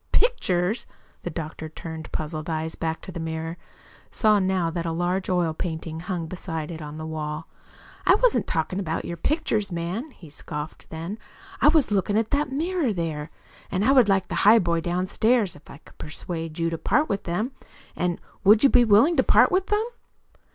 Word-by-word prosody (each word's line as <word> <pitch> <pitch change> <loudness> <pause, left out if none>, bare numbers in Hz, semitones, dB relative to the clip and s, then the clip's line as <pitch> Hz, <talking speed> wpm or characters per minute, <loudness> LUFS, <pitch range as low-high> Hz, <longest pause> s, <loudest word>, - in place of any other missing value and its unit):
"Pictures!" 220 - +1 0.3
The - - -4
doctor, 160 0 -6
turning 160 0 -7
puzzled 155 +1 -4
eyes 160 0 -2
back 160 0 -3
to - - -7
the 170 - -6
mirror, 160 0 -3 0.5
saw 215 -2 +3
now 185 -3 +1
that 170 0 -3
a - - 0
large 175 +3 -1
oil 175 -3 +1
painting 160 -1 -4
hung 175 -1 -3
beside 165 -2 -5
it 160 -1 -7
on 150 0 -7
the 155 - -5
wall. 155 0 -4 0.6
"I 370 - +6
wasn't - - +2
talking 175 +3 -1
about 165 -5 -2
your 170 - -4
pictures, 225 - 0
man," 175 - -3
he 190 - -15
scoffed 150 +1 -7
then. 165 +7 -5 0.4
"I - - +6
was 300 -6 +4
looking 205 +1 +1
at 225 0 0
that 285 -1 +1
mirror 320 -1 0
there, 160 -5 -3 0.4
and 195 +2 0
I'd 255 -5 +5
like 195 -1 +2
the - - -1
highboy 185 -6 +5
downstairs, 185 +5 +1
if 145 - -17
I - - -10
could - - -21
persuade 165 +1 -5
you 165 0 0
to 165 - -3
part 300 - +2
with 200 - -2
them, 200 +9 -1 0.4
and 175 -1 -1 0.2
WOULD 210 +2 +6
you 275 - +7
be 245 - +6
willing 230 +10 +5
to 260 - +5
part - - +5
with 375 +1 +1
them?" 420 +1 +1
175 Hz, 185 wpm, -25 LUFS, 160-220 Hz, 0.6 s, you